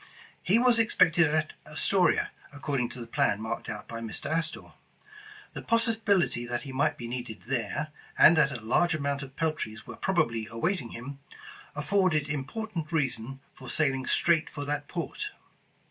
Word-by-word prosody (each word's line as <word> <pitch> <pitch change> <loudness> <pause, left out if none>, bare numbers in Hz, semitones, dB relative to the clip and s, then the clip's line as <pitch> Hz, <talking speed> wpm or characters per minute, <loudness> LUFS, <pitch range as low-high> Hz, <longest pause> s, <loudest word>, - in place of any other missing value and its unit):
He 195 +5 +3
was 240 -1 +5
expected 175 -7 +4
at 155 +1 0
Astoria, 180 +5 +2 0.2
according 140 -4 -2
to 130 - -9
the 120 - -6
plan 105 -2 +1
marked 110 +1 -4
out - - -6
by 115 - -6
Mr. 115 +5 -4
Astor. 165 0 -2 0.8
The - - -6
possibility 220 - +2
that 120 -1 -2
he 135 - -7
might 145 +3 +1
be 120 - -6
needed 120 -2 -5
there, 125 +3 -2 0.3
and 170 - +8
that 150 -3 +4
a 125 - -4
large 175 +9 +3
amount 140 -1 -1
of 135 -1 -9
peltries 155 -10 -2
were - - -8
probably 120 - 0
awaiting 130 +3 -1
him, 135 +5 -8 0.6
afforded 155 -1 +2
important 160 +4 -4
rea 150 -5 +2
sons 125 +3 -6 0.2
for 130 - -10
sailing 135 -4 +1
straight 170 -1 +3
for 145 -1 -6
that 145 0 -2
port. 185 - -4
145 Hz, 160 wpm, -28 LUFS, 125-170 Hz, 0.8 s, and